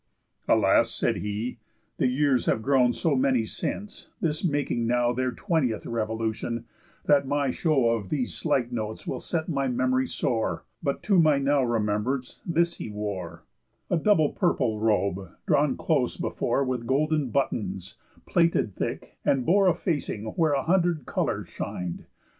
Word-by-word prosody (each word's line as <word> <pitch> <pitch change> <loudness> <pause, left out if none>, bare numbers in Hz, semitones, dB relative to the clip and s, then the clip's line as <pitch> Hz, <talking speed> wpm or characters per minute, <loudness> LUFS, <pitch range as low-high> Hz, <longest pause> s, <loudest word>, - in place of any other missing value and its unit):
"Alas," - - +4
said - - -1
he, 105 +4 -4 0.4
"the - - +2
years 130 0 +2
Have 110 - +1
grown 130 -1 +4
so 150 +4 0
many 130 -3 +2
since—this 170 - -4
making 145 -8 0
now 120 0 +2
Their 130 +1 0
twentieth 130 - -1
revolution—that 115 +5 -2
my 140 -1 +1
show 135 -8 +2
Of 110 -5 -2
these 130 -5 -1
slight 135 -6 0
notes 110 -2 -4
will - - -3
set 160 -2 -2
my 140 -5 0
memory 130 +1 +1
sore, 115 -4 -1 0.2
But, 140 -3 -2
to 200 -4 +4
my 155 -3 +5
now 140 +1 +2
remembrance, 120 +2 -1
this 170 0 +1
he - - -6
wore: 95 -5 -5 0.5
A 175 - +3
double 160 -4 +3
purple 125 - 0
robe, 100 -4 0
drawn - - +2
close - - 0
before 140 - 0
With 125 -3 -3
golden 150 0 +1
buttons, 105 -8 -2 0.3
plaited 170 - +2
thick, - - -5
and 130 -3 +2
bore 195 +3 +4
A 180 - +4
facing 145 - -2
where 155 +5 +1
a 135 - +1
hundred 170 -5 +1
colours - - -2
shin'd. 90 -2 -5
130 Hz, 145 wpm, -26 LUFS, 115-150 Hz, 0.5 s, my